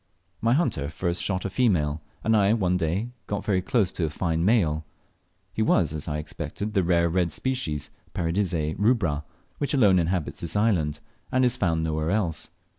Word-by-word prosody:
My 115 +2 +3
hunter 120 - 0
first 85 +2 -2
shot 95 -1 -1
a - - 0
female, 80 - +1 0.2
and 110 0 +3
I 105 0 +4
one 95 -5 +1
day 90 +7 -1 0.2
got 100 - -3
very 95 -3 +2
close 95 0 +1
to 85 - -1
a - - -1
fine 80 +1 -1
male. 85 -7 +2 0.7
He - - -2
was, 90 -7 +3
as 75 -2 -3
I 75 -1 -1
expected, 80 +7 -5
the 100 - +3
rare 85 -1 +3
red 85 0 +1
species, 80 - -3 0.2
Paradisea 85 -3 0
rubra, 100 - +2 0.4
which 145 0 0
alone 100 -8 +5
inhabits 85 -1 -1
this 85 +1 -2
island, 90 -9 +1 0.3
and 130 0 +3
is 125 - +2
found 80 -4 +1
nowhere 80 0 -1
else. 90 -5 -1
90 Hz, 180 wpm, -26 LUFS, 80-105 Hz, 0.7 s, alone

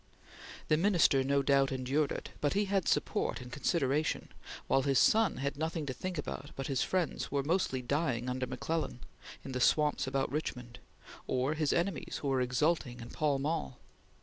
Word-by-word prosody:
The 155 - +3
Minister, 165 -7 +4
no 140 +1 +2
doubt, 135 0 +3
endured 135 +3 0
it, - - -5
but 145 - +1
he 205 +1 +2
had 195 -3 0
support - - 0
and 125 0 -10
consideration, 145 +2 0 0.4
while 135 - +3
his 135 0 +1
son 220 - +4
had 140 +2 -2
nothing 160 0 -2
to 130 - -3
think 185 +7 -5
about 145 -1 -5
but 135 - -4
his 135 -2 0
friends 185 -3 0
who - - -7
were 140 - +2
mostly 145 -5 0
dying 125 -3 0
under 130 0 -2
McClellan 130 +1 -3 0.4
in 135 - -5
the 130 -1 -2
swamps 150 +1 +3
about 135 0 -1
Richmond, 125 -5 -4 0.5
or 130 +3 +1
his 155 -2 0
enemies 175 0 -1
who 140 - 0
were 130 -1 +2
exulting 125 0 0
in 115 0 -9
Pall 150 -3 +1
Mall. 145 -2 -2
140 Hz, 180 wpm, -32 LUFS, 130-160 Hz, 0.5 s, Minister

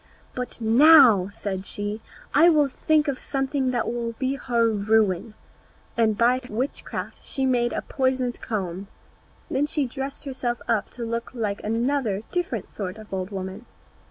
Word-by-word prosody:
"But 250 -1 -5
now," 235 - +7
said 195 -2 -4
she, 205 +2 -4 0.3
"I 325 +4 +7
will 300 -3 +4
think 305 +3 +1
of 275 -2 -1
something 270 -1 -1
that 245 -2 0
will 235 -1 -3
be 260 +3 -1
her 240 -4 +1
ruin." 210 -1 +1 0.6
And 220 -3 +2
by 245 +3 +3
witchcraft 250 +6 -4
she 270 - -2
made 245 -2 +2
a - - -3
poisoned 260 -2 -1
comb. 195 -3 -4 0.6
Then 285 +2 0
she 295 -1 0
dressed 270 +2 -6
herself 255 -4 -3
up 220 -3 +1
to 235 - -3
look 230 +1 -3
like 210 -4 -2
another 225 -2 0
different 330 - -2
sort 195 -1 -6
of 215 -2 -11
old 185 0 -2
woman. 195 +3 -6
235 Hz, 155 wpm, -25 LUFS, 210-265 Hz, 0.6 s, now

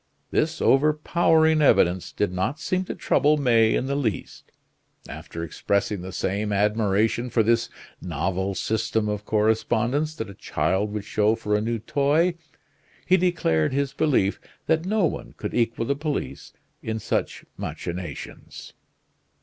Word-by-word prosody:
This 160 +1 0
overpowering 160 +2 +3
evidence 90 -10 +3
did 105 - -1
not 95 +12 -2
seem 185 +4 -1
to - - -5
trouble 150 +1 +2
May 115 -5 +3
in - - 0
the 140 +1 -1
least. 115 -10 -4 0.6
After 85 - -7
expressing 100 +4 -1
the 95 +1 -7
same 100 +3 -2
admiration 105 +3 +1
for 115 -1 +2
this 115 +1 +2 0.3
novel 95 +4 -2
system 110 +1 -1
of 105 0 -3
correspondence 120 +7 +1
that 110 - -5
a 100 - -9
child 100 +2 -1
would 105 -1 -4
show 110 +1 +2
for 105 -2 -1
a 105 - +1
new 115 +2 -1
toy, 145 +9 +1 0.7
he 185 - +5
declared 165 - +1
his 140 0 -1
belief 135 -10 +1 0.3
that 160 +2 +1
no 210 -2 +2
one - - -4
could - - -5
equal 115 -1 0
the 140 - +1
police 150 0 -4 0.3
in 110 0 -3
such 110 - -2
machinations. 85 -4 -7
115 Hz, 140 wpm, -24 LUFS, 100-145 Hz, 0.7 s, he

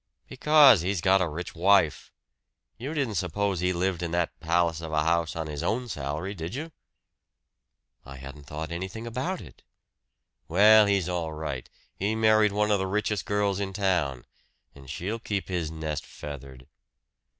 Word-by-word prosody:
"Because, 150 - +6
he's 95 +1 -1
got 95 +3 +4
a 90 - +1
rich 85 +4 -6
wife. 90 -2 +2 0.6
You 135 +8 -6
didn't 135 -7 -1
suppose 95 +1 -1
he 90 +1 +1
lived 90 0 -1
in 85 - -2
that 85 -1 -1
palace 85 0 +1
of 80 -1 -6
a 75 -1 +1
house 85 +1 +1
on 80 -1 -3
his 75 -2 -5
own 125 +2 -1
salary, 75 +4 -4
did 85 +2 -6
you?" 160 +4 -5 1.3
"I 70 - -10
hadn't 70 +2 -10
thought 80 +1 -5
anything 95 +6 -5
about 130 +11 -3
it." 70 -9 -14 0.9
"Well, 105 +4 +6
he's 100 -3 +1
all 85 -3 -2
right 75 -5 -5 0.3
he 105 +3 -1
married 110 -1 +4
one 105 +1 +1
of 100 - +3
the 95 - -1
richest 105 -1 -1
girls 100 -1 0
in 95 -1 -3
town. 85 -10 0 0.5
And 70 -2 -14
she'll 90 +9 -4
keep 100 -4 -3
his 85 -4 -2
nest 80 -2 -4
feathered." 70 -3 -9
90 Hz, 165 wpm, -27 LUFS, 80-105 Hz, 1.3 s, Because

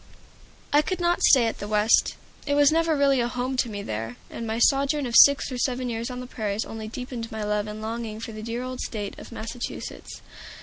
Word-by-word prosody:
I 295 - +6
could 370 +4 -3
not 345 0 +1
stay 255 -4 +6
at 225 - -2
the 205 - -5
West. 210 +1 +3 0.3
It 285 - +2
was 290 0 +5
never 325 -1 +2
really 275 -2 +3
home 245 +2 -1
to 245 - +1
me 205 -2 -5
there, 115 - -4 0.2
and 230 - -5
my 220 +1 -2
sojourn 275 +3 +2
of 235 -2 -3
six 280 0 +7
or 250 - -4
seven 255 0 -1
years 230 +1 -3
on 250 0 -5
the - - -7
prairies 215 -4 -3
only 220 -1 -7
deepened 240 0 -6
my 220 -1 -4
love 210 0 -1
and 215 +1 -7
longing 225 -1 -4
for 225 - -6
the 215 0 -8
dear 230 +2 -4
old 255 0 -6
State 205 -3 -5
of - - -11
Massachusetts. 230 +2 -7
235 Hz, 220 wpm, -25 LUFS, 220-265 Hz, 0.3 s, six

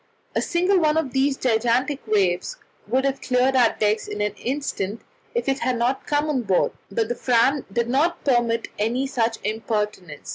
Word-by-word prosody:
A - - +2
single 360 +3 +2
one 310 -1 +2
of 280 -6 -1
these 270 +1 +2
gigantic 245 +4 +1
waves 195 - +1 0.3
would 265 +2 +1
have 275 0 -1
cleared 255 +1 +2
our 245 -3 +4
decks 215 0 +1
in 210 - -5
an 210 -1 0
instant 235 -5 -3 0.3
if 475 - -1
it 270 0 +1
had 250 -2 -1 0.3
come 295 +1 +1
on 285 -4 0
board, 195 -5 +1 0.2
but 220 +3 -1
the 240 - -1
Fram 250 +3 +2
did 235 +3 0
not 295 +8 0
permit 240 -4 +1
any 235 +5 0
such 230 -4 0
impertinence. 210 -4 -3
245 Hz, 175 wpm, -23 LUFS, 220-275 Hz, 0.3 s, our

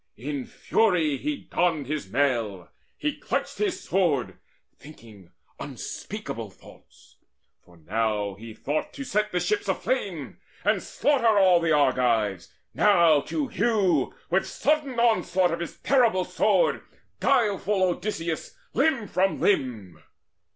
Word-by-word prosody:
In 135 +3 -5
fury 175 -10 +1
he 300 - -3
donned 165 - -1
his 150 +2 -4
mail, 115 -10 0 0.3
He 300 -1 -3
clutched - - -3
his 410 -4 -1
sword, 165 -10 0 0.4
thinking 110 - -15 0.3
unspeakable - - -6
thoughts; - - -19 0.5
For 90 -1 -20
now 105 +4 -1
he 110 +2 -11
thought 150 +3 -3
to 280 - -6
set 210 -4 -1
the 180 - 0
ships 415 - -1
aflame, - - -2 0.2
And - - +2
slaughter 235 -7 +2
all 185 -3 +6
the 165 -1 0
Argives, 120 - +1 0.2
now, 170 -8 +5
to 305 -3 -1
hew 195 - +1 0.2
With 190 +2 +2
sudden 285 -4 0
onslaught 190 -6 +2
of 170 - -2
his 170 - -6
terrible 235 -9 +3
sword - - +2 0.4
Guileful 205 -3 +2
Odysseus 175 - -2 0.2
limb 270 -10 +1
from 190 +2 0
limb. 115 - -1
175 Hz, 125 wpm, -26 LUFS, -, 0.5 s, all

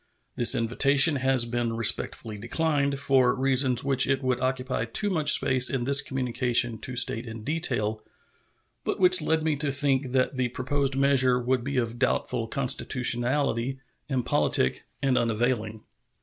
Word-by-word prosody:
This 120 - +4
invitation 135 +6 +2
has 130 -2 +1
been 120 -1 -3
respectfully 115 -1 -1
declined, 140 +3 -1
for 130 -3 +2
reasons 130 -2 +2
which 135 -1 +2
it 135 0 -1
would 130 -1 -1
occupy 130 -2 -2
too 200 - -3
much 155 -5 +5
space 130 -1 +3
in 130 -3 -2
this 140 +2 +4
communication 120 -3 -1
to 130 - -7
state 120 -1 -1
in 110 -1 -8
detail, 120 -8 -2 0.8
but - - -3
which 185 -2 +4
led 160 +1 0
me 155 -1 0
to 145 0 -1
think 135 -2 -1
that 130 +1 0
the 125 -1 0
proposed 135 +2 -2
measure 130 -2 +2
would 125 0 -1
be 140 +1 -4
of 120 -1 -2
doubtful 125 -2 -1
constitutionality, 130 0 0 0.3
impolitic, 125 - 0 0.2
and 130 -2 +2
unavailing. 115 -1 -2
130 Hz, 150 wpm, -25 LUFS, 120-140 Hz, 0.8 s, much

